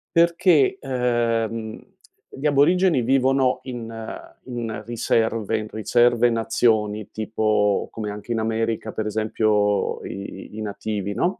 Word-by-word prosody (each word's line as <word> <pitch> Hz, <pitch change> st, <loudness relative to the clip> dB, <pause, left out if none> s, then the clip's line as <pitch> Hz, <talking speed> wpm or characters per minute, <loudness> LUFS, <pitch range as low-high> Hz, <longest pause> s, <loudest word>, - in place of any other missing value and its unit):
perché, 175 Hz, -, +4 dB
ehm, 115 Hz, -, -1 dB, 0.5 s
gli 135 Hz, -, -7 dB
aborigeni 160 Hz, +2 st, +4 dB
vivono 130 Hz, +1 st, +2 dB
in 120 Hz, -3 st, -6 dB
ehm, 115 Hz, -1 st, -8 dB, 0.2 s
in 115 Hz, -3 st, -4 dB
riserve 115 Hz, -1 st, 0 dB
in 110 Hz, 0 st, -4 dB
riserve 120 Hz, +2 st, +3 dB
nazioni, 110 Hz, -2 st, +1 dB
tipo 110 Hz, -2 st, 0 dB
come 110 Hz, -2 st, -5 dB
anche 105 Hz, +3 st, -8 dB
in 115 Hz, -, 0 dB
America, 110 Hz, 0 st, -1 dB
per 110 Hz, -, -3 dB
esempio, 105 Hz, -1 st, +1 dB
i 100 Hz, +2 st, -8 dB
i -, -, -4 dB
nativi, 105 Hz, -1 st, -3 dB
no, 180 Hz, -, -1 dB
115 Hz, 120 wpm, -23 LUFS, 110-125 Hz, 0.5 s, perché